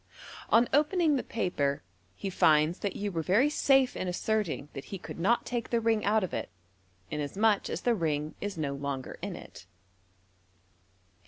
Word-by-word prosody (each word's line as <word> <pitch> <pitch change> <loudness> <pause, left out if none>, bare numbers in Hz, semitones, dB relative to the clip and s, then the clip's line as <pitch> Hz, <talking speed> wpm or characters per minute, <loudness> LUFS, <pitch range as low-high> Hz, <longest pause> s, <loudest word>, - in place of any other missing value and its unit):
On 235 +1 +5
opening 305 +2 +3
the 260 - 0
papei 145 -10 -1 0.3
he 195 - -4
finds 155 0 +3
that 200 -2 -3
you 205 0 -3
were 165 -3 -1
very 215 - +3
safe 270 -3 +3
in 185 - -3
asserting 180 -4 -1
that 135 - -7
he 195 - -6
could 175 - -9
not 230 +8 +2
take 240 -2 -3
the 235 - +2
ring 225 -1 +1
out 215 +1 +3
of 185 - -4
it, - - -3 0.6
inasmuch 195 +8 +1
as - - -3
the 240 - +2
ring 155 -6 -1
is 205 -3 -4
no 145 -3 -2
longer 140 -1 -5
in - - -4
it. - - -12
200 Hz, 170 wpm, -29 LUFS, 155-230 Hz, 0.6 s, On